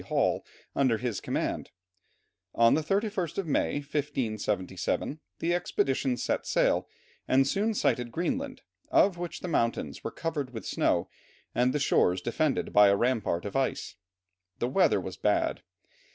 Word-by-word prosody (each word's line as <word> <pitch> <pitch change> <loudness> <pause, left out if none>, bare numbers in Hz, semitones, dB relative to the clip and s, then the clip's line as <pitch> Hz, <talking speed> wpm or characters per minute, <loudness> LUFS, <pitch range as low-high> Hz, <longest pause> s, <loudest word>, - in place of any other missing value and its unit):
Hall, - - +1 0.3
under 130 -5 +3
his 115 -4 -3
command. - - -2 0.9
On 115 0 +5
the 160 - +2
31st 195 0 -1
of 195 - -1
May, 150 - +1
1577, 115 - -2 0.2
the 170 +1 0
expedition 135 -7 0
set - - -1
sail, - - +2 0.4
and 135 +1 +4
soon 210 +8 0
sighted 120 -10 +1
Greenland, 260 - -2 0.3
of 185 -3 +4
which 175 -1 -5
the - - -4
mountains 115 - -1
were - - -2
covered 145 -4 -4
with 110 - -6
snow, - - +1 0.5
and 125 +1 +2
the 150 - 0
shores 95 -9 +3
defended 135 +8 -1
by 105 0 +8
a 100 - +5
rampart 115 -8 0
of 100 - -5
ice. 135 -1 -1 0.6
The 120 - -1
weather 180 +8 +3
was - - -6
bad. - - +1
135 Hz, 145 wpm, -29 LUFS, 115-170 Hz, 0.9 s, by